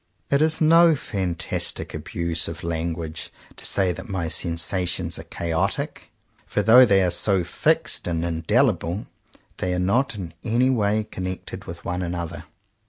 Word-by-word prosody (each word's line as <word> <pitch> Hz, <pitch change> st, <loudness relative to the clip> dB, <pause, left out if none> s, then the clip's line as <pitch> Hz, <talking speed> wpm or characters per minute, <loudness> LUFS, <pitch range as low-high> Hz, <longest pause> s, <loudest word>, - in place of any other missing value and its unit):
It 140 Hz, +1 st, +3 dB
is 160 Hz, 0 st, +3 dB
no 165 Hz, +1 st, +6 dB
fantastic 90 Hz, -, -2 dB
abuse 85 Hz, 0 st, -2 dB
of 85 Hz, +1 st, -7 dB
language 80 Hz, -1 st, -3 dB, 0.2 s
to -, -, -4 dB
say 95 Hz, -2 st, +2 dB
that 110 Hz, -, -8 dB
my 90 Hz, -4 st, -2 dB
sensations 85 Hz, +1 st, -1 dB
are -, -, -7 dB
chaotic; 85 Hz, +3 st, -2 dB, 0.4 s
for 105 Hz, -, 0 dB
though 120 Hz, +4 st, +8 dB
they 100 Hz, -2 st, +4 dB
are 90 Hz, -, +2 dB
so 95 Hz, +1 st, +2 dB
fixed -, -, 0 dB
and 85 Hz, -1 st, -1 dB
indelible, 90 Hz, -, +1 dB, 0.5 s
they 90 Hz, 0 st, -1 dB
are -, -, -1 dB
not 115 Hz, +8 st, +1 dB
in 90 Hz, -5 st, -6 dB
any 125 Hz, +4 st, +2 dB
way 110 Hz, -3 st, +1 dB
con 95 Hz, -3 st, -6 dB
nected 95 Hz, -1 st, -6 dB
with 85 Hz, 0 st, -8 dB
one 90 Hz, +1 st, -2 dB
another. 85 Hz, -1 st, -4 dB
90 Hz, 155 wpm, -24 LUFS, 85-110 Hz, 0.5 s, though